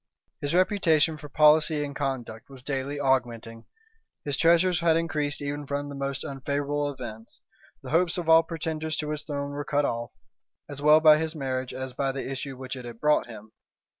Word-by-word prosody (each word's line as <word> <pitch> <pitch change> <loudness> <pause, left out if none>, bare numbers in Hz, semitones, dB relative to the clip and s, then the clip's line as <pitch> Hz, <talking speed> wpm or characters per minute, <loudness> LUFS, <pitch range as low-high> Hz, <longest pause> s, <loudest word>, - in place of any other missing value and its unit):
His 145 +3 -2
reputation 170 -5 +3
for 150 - -10
policy 150 0 +4
and 140 -1 -8
conduct 130 -6 -4
was 135 -2 -13
daily 140 +1 -3
augmenting; 120 -4 -1 0.6
his 145 -2 -1
treasures 170 +3 +3
had 165 -1 +3
increased 150 -3 -1
even 145 0 -4
from 145 0 -3
the 140 - -7
most 140 -1 -3
unfavorable 145 +1 -2
events; 115 -4 -9 0.4
the - - -7
hopes 170 +2 +2
of 175 -2 -4
all 165 0 +7
pretenders 160 -1 -4
to 150 -1 -3
his 150 -1 -3
throne 140 -1 -4
were 145 +1 -4
cut 145 0 0
off, 115 -2 -3 0.6
as 145 -1 -7
well 150 +1 +6
by 155 -1 +7
his 160 +1 -3
marriage 130 -3 -3
as 130 0 -6
by 135 +1 -1
the 135 0 -5
issue 135 0 -5
which 130 0 -6
it 130 - -8
had 120 -1 -9
brought 150 -2 +2
him. 110 -2 -11
145 Hz, 190 wpm, -26 LUFS, 130-155 Hz, 0.6 s, all